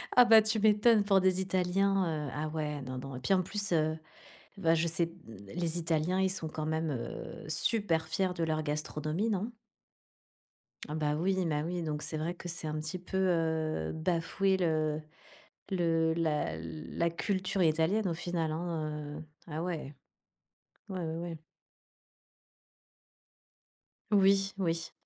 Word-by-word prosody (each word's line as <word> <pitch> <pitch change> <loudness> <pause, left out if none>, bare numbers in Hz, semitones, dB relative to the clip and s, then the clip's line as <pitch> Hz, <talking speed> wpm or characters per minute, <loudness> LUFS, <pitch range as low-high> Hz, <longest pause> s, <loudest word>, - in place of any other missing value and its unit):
Ah, 245 - +9
bah, 225 -2 +8
tu 220 0 0
m'étonnes 215 +1 +5
pour 195 -1 +4
des 185 0 +3
Italiens, 185 -4 +1
heu, - - -5
ah, 155 +1 -2
ouais, 150 -2 -3
non, 130 0 -5
non, 135 +1 -6
et 125 - -5
puis, 195 - +1
en 185 - +4
plus, 205 +2 -3
heu, 155 0 +2 0.6
bah, 165 -4 +4
je 165 +1 +1
sais, 165 +1 +1
mmh, 165 -9 -13 0.2
les 170 -1 -1
Italiens, 170 +3 +1
ils 190 - +3
sont, 175 -4 -3
quand 155 0 -4
même, 160 0 0
heu, 120 -4 -5
super 165 -1 +1
fiers 185 +3 0
de 165 - 0
leur 155 -1 0
gastronomie, 155 +6 -1
non? 205 +3 -1 1.4
Ah, 150 - -3
bah, 150 -1 0
oui, 185 +3 +1
ma 150 -2 0
oui, 175 +1 -2
donc 150 -2 -3
c'est 155 +1 -3
vrai 165 +3 -2
que 175 - -7
c'est 165 -1 -3
un 155 0 -2
petit 155 +4 -4
peu, 190 +2 -4
heu, 160 - +1
bafouer 180 +4 +1
le 155 -3 +1 0.7
le 165 -3 +2
la 155 - 0
l 80 -1 -7
la 170 0 +3
culture 190 +1 -1
italienne, 165 +6 +2
au 170 - -1
final, 165 -1 -2
hein, 155 -3 -3
heu, - - -9 0.2
ah, 160 0 -4
ouais. 160 -5 -4 0.9
Ouais, 190 -2 -4
ouais, 160 -2 -3
ouais. 170 -1 -5 2.7
Oui, 195 -1 +4
oui. 165 -2 -1
165 Hz, 160 wpm, -31 LUFS, 155-190 Hz, 2.7 s, Ah